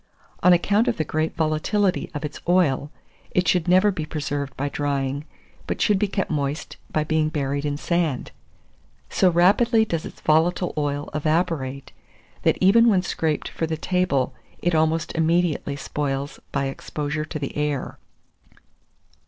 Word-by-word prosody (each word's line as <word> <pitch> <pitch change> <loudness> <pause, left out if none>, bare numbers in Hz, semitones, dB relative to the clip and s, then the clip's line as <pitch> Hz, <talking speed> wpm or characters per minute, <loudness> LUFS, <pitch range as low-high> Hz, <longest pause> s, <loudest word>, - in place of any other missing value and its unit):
On 180 - +6
account 200 +6 +3
of 240 - +1
the 160 - +1
great 155 +1 -2
volatility 165 +5 +1
of 145 - -3
its 150 - -7
oil, 150 -6 +3 0.4
it 180 0 +1
should 180 -2 +2
never 185 +3 +5
be 170 -5 -4
preserved 145 -3 -4
by 145 - -1
drying, 140 0 -2 0.4
but - - -2
should 205 -3 +3
be 210 - +2
kept 195 -2 -2
moist 145 0 -2
by 155 - +1
being 155 0 +1
buried 140 -2 -2
in 145 -1 -1
sand. 165 -4 -1 0.8
So 185 - +4
rapidly 215 +7 +4
does 165 -6 -2
its - - -9
volatile 170 +3 +2
oil 145 -1 -2
evaporate, 150 -3 -1 0.5
that - - +2
even 230 +5 +6
when 190 -4 +3
scraped 160 -3 -1
for 165 - -3
the 160 0 -2
table, 175 -6 0 0.2
it 175 - 0
almost 160 +1 +1
immediately 165 -3 +1
spoils 140 0 -3
by 140 -1 0
exposure 150 +2 -3
to 155 - -5
the 140 -2 -5
air. 150 -2 -2
155 Hz, 155 wpm, -23 LUFS, 145-180 Hz, 0.8 s, On